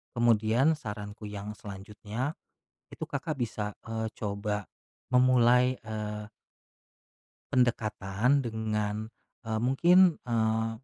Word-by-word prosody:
kemudian 120 +4 +4
saranku 105 -6 -7
yang 105 0 -6
selanjutnya, 105 +6 -5 0.6
itu - - -5
Kakak 150 +2 -3
bisa, 110 -4 -3
eee, 110 0 -3
coba 105 -1 -2 0.5
memulai, 125 0 +5
eee 105 -1 -5 1.3
pendekatan 120 0 +2
dengan, 110 -2 -2 0.3
eee, 110 -1 -1
mungkin, 170 +8 +5
eee, 110 -1 +1
110 Hz, 90 wpm, -29 LUFS, 105-125 Hz, 1.3 s, memulai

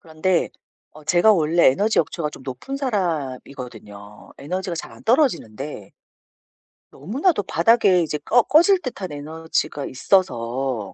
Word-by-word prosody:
그런데 165 +3 0 0.4
어 155 0 -15
제가 175 +7 +4
원래 165 -1 +4
에너지 205 +12 +1
역치가 160 -1 -4
좀 140 - -12
높은 135 - -6
사람이거든요. 130 - -5
에너지가 180 +4 -4
잘 - - -7
안 - - -15
떨어지는데 150 - -1 1.0
너무나도 235 - 0
바닥에 190 0 +3
이제 155 -2 -2
꺼 235 +11 +3
꺼질 345 - +4
듯한 200 - -6
에너지가 155 0 -3
있어서 130 - -1
160 Hz, 300 characters per minute, -22 LUFS, 135-200 Hz, 1.0 s, 제가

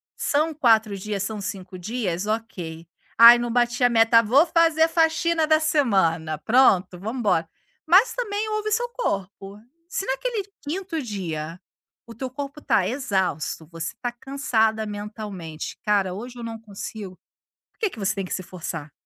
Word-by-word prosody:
São 310 +2 0
4 225 -7 +3
dias, 200 0 -3
são 215 +1 -4
5 185 -1 -6
dias, 200 -3 -3
ok. 180 -7 -4 0.3
"Ai 235 +1 +10
não 240 -1 -2
bati 245 +1 +1
a 245 - +6
meta, 230 0 +5
vou 265 +9 +4
fazer 325 -1 +3
faxina 325 0 +2
da 310 0 +4
semana", 190 - +1
pronto, 190 - +3
vamos 220 +6 -4
embora. 170 -8 +1 0.4
Mas 400 +8 +5
também 430 -3 -2
ouve 430 0 -2
seu 480 +3 +1
corpo. 200 - -4 0.3
Se 385 - -3
naquele 415 - -2 0.2
5º 330 +1 -4
dia, 170 - -5 0.5
o 235 - -11
teu 255 +3 -5
corpo 280 +2 -7
tá 190 -9 +2
exausto, 190 - -2
você 165 -1 -5
tá 245 - -2
cansada 230 -4 0
mentalmente, 205 -6 -7
cara, 200 -3 +1
hoje 245 +5 -8
eu 235 - -7
não 225 -1 -6
consigo. 200 -2 -8 0.5
Por - - -44
que 430 - +1
que 225 - -11
você 200 0 0
tem 195 - -3
que - - -5
se 185 - -3
forçar? 165 -4 -7
225 Hz, 160 wpm, -24 LUFS, 190-285 Hz, 0.5 s, Ai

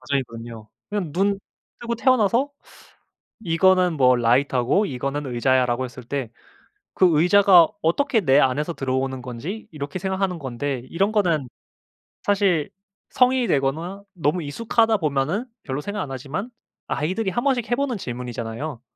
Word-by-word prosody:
과정이거든요. 115 -4 -4 0.2
그냥 190 -8 -3
눈 195 +3 +1 0.4
뜨고 235 0 -2
태어나서 250 +2 +2 0.9
"이거는 180 +1 +3
뭐 125 -1 +5
라이터고 125 - +2
이거는 140 +1 -3
의자야."라고 125 0 +1
했을 125 0 -8
때 130 -3 -4 0.7
그 185 - +5
의자가 180 -2 +6 0.2
어떻게 225 - +2
내 140 -5 +4
안에서 145 +6 +1
들어오는 130 0 -2
건지 145 - -6
이렇게 145 +4 -5
생각하는 190 -1 -1
건데 130 0 -3
이런 195 +5 +1
거는 165 - +1 0.8
사실 195 -7 +2 0.4
성인이 250 -1 +3
되거나 165 +7 -1
너무 165 0 -1
익숙하다 225 +7 +1
보면은 155 - -1 0.2
별로 135 0 -3
생각 205 +3 -4
안 135 - -5
하지만 145 - -5 0.4
아이들이 190 +8 -1
한번씩 245 0 0
해 - - +4
보는 265 -2 -1
질문이잖아요. 120 - -5
155 Hz, 330 characters per minute, -23 LUFS, 130-200 Hz, 0.9 s, 의자가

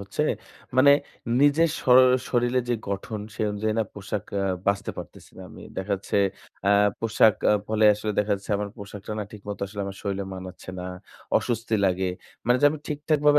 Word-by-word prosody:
হচ্ছে। 100 +9 -2 0.5
মানে 140 +2 +8 0.5
নিজের 150 +3 +4
শর 125 0 +7 0.3
শরীরে 120 +1 +2
যে 120 - +2
গঠন 100 +2 -3
সে - - -8
অনুযায়ী 105 +1 -1
না - - +4
পোশাক 100 0 -4 0.2
আ - - 0 0.2
বাছতে 100 0 +1
পারতেছি - - -10
না - - -8
আমি। - - -12
দেখা 95 +2 -2
যাচ্ছে 95 - -3 0.5
অ্যা 100 - +4 0.3
পোশাক 110 -2 +4 0.3
ফলে 110 0 +2
আসলে 105 +1 -3
দেখা 105 0 +2
যাচ্ছে 100 +2 -10
আমার 105 0 -3
পোশাকটা 100 0 -8
না - - -1
ঠিক 105 - -10
মত 100 - -4
আসলে 100 +1 -7
আমার 100 0 -6
শরীরে 100 -1 -2
মানাচ্ছে 95 0 -8
না, 90 - -5 0.5
অসুস্তি 115 -1 -2
লাগে। 95 0 +1 0.4
মানে 125 +1 +5
যে - - +3
আমি 155 - -4
ঠিকঠাক 150 +1 0
ভাবে 145 0 +7
105 Hz, 185 wpm, -25 LUFS, 100-120 Hz, 0.5 s, মানে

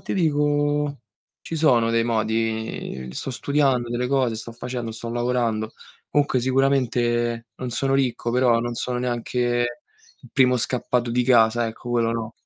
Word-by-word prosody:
ti - - -4
dico, 145 -3 +1 0.4
ci 165 - -5
sono 120 -7 +3
dei 115 0 +2
modi. 110 - -2
Sto 135 - -5
studiando 135 -2 +1
delle 120 +1 -1
cose, 130 -4 +1
sto 115 +1 -8
facendo, 120 -1 -5
sto 115 +1 -6
lavorando. 120 -2 -1 0.4
Comunque 145 -3 +2
sicuramente 120 -3 +1
non 125 -1 -5
sono 135 +3 0
ricco, 125 -3 0
però 120 -1 +3
non 120 0 -3
sono 125 +1 -2
neanche 120 0 0 0.6
il 125 - -15
primo 125 -2 +4
scappato 120 0 -1
di 125 +1 +1
casa, 120 -1 +4
ecco, 115 +2 -7
quello 115 -1 +1
no. 115 -1 -4
120 Hz, 150 wpm, -23 LUFS, 115-130 Hz, 0.6 s, primo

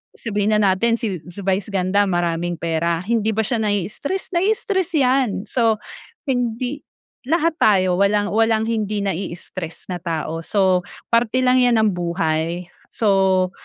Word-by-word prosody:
Sabihin 210 -1 0
na 210 - +3
natin 230 +5 +2
si 215 -6 -3
si 175 +3 -10
Vice 195 +1 0
Ganda, 200 0 +1
maraming 175 -1 -1
pera, 165 0 -1
hindi 220 0 0
ba 220 - +1
siya 230 +2 -1
nai-stress? 210 - -2
Nai-stress 380 -1 +1
'yan. 255 -7 +1
So, 225 -2 +1 0.5
hindi 245 +2 -2 0.4
lahat 330 +1 +2
tayo 185 -4 +3
walang 205 +1 +2
walang 225 0 +2
hindi 215 -2 -1
nai-stres 175 -2 -5
na 180 - -2
tao, 165 -1 -3
so 185 -2 +2 0.3
parte 235 +1 +2
lang 255 0 +4
'yan 240 -2 +4
ng 220 -1 +3
buhay. 170 0 -1 0.3
So 190 -3 +2
205 Hz, 140 wpm, -21 LUFS, 180-230 Hz, 0.5 s, lang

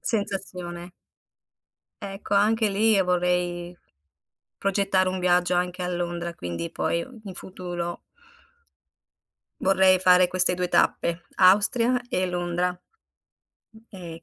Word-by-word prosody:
Sensazione. 180 -5 -4 1.1
Ecco, 195 0 -5
anche 215 +2 +3
lì 210 +2 +2
vorrei 180 -1 -1 0.8
progettare 195 -1 +1
un 185 0 -3
viaggio 180 0 +2
anche 180 +1 -2
a 180 - -2
Londra, 175 -1 -3
quindi 90 - -5
poi 170 - -1 0.2
in 190 -2 -8
futuro 175 -2 -6 1.6
vorrei 190 -1 +4
fare 180 -1 +5
queste 185 0 +3
2 180 0 -2
tappe: 170 0 +1
Austria 230 +6 +4
e 185 -4 0
Londra. 180 0 -2 0.9
Mh 220 - -17 0.2
e 170 -2 -9
180 Hz, 105 wpm, -25 LUFS, 175-195 Hz, 1.6 s, fare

